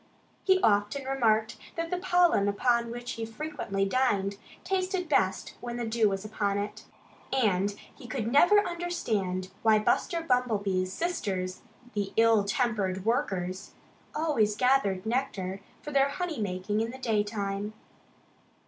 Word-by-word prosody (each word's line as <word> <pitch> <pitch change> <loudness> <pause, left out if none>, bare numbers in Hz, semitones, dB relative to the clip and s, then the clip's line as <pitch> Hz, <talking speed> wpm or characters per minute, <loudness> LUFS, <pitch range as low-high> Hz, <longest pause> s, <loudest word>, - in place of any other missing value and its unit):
He 380 -1 +4
often 210 +5 +2
remarked 225 -5 +1 0.2
that 330 0 -3
the 360 - 0
pollen 355 - +3
upon 235 +3 +2
which 240 +1 -5
he 230 - -4
frequently 225 -5 -3
dined 200 -4 +1 0.2
tasted 370 -1 -1
best 190 -11 +1
when 240 0 -5
the 240 - -2
dew 225 -1 +2
was 195 +1 -3
upon 205 -2 -1
it. 205 +1 -4 0.5
And 205 -6 +2 0.2
he 255 - -12
never 285 - +5
could - - -6
understand 215 - -2
why 220 -1 +5
Buster 335 - +1
Bumblebee's 205 - +1
sisters, 195 - -2 0.3
the 200 -2 -2
ill 225 -2 +5
tempered 200 -4 0
workers, 190 -5 -1 0.4
always 285 -10 +2
gathered 215 -7 +2
nectar 215 -6 -2 0.2
for 295 - -6
their 275 -1 +4
honey 335 -4 -3
making 200 +2 -1
in 225 - -1
the 255 - -7
daytime. 210 -3 -1
220 Hz, 135 wpm, -29 LUFS, 200-270 Hz, 0.5 s, never